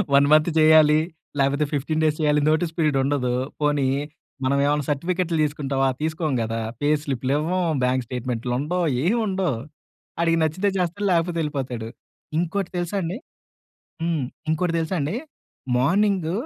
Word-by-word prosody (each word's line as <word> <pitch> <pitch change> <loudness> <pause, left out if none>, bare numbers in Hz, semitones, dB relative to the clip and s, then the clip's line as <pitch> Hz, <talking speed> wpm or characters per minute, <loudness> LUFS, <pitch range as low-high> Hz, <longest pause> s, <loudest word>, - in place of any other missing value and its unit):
1 140 0 +5
month 155 +2 +5
చేయాలి. 155 -1 +6 0.4
లేకపోతే 140 +2 +2
15 155 +3 -1
days 155 -1 +2
చేయాలి 150 -1 +3
నోటీస్ 160 +1 +1
పీరియడ్ 155 -4 +2
ఉండదు. 130 -3 0 0.3
పోనీ 145 -2 +1 0.6
మనమేమన్నా 140 +2 +2
సర్టిఫికేటులు 170 +2 -1
తీసుకుంటావా 140 -2 0
తీసుకోం 155 0 -1
గదా! 115 0 -2 0.2
పే 145 - 0 0.2
స్లిపులు 135 -1 -1
ఇవ్వం, 175 +3 0 0.2
బ్యాంకు 125 0 +1
స్టేట్‌మెంటులుండవు. 125 +7 -2 0.2
ఏయి 190 +7 +3
ఉండవు. 190 - 0 0.6
ఆడికి 165 0 +2
నచ్చితే 180 +6 +1
జేస్తాడు, 180 +3 -1
లేకపోతే 170 0 +1
యెళ్ళిపోతాడు. 130 -6 -3 0.5
ఇంకోటి 175 +2 -1
తెలుసా 175 +3 -2
అండి 180 +5 -3 0.9
హ్మ్. 165 -3 0 0.3
ఇంకోటి 165 +2 0
తెలుసా 165 +3 -1
అండి? 150 +10 -1 0.6
మార్నింగ్ 185 +5 +2
155 Hz, 130 wpm, -23 LUFS, 140-170 Hz, 0.9 s, చేయాలి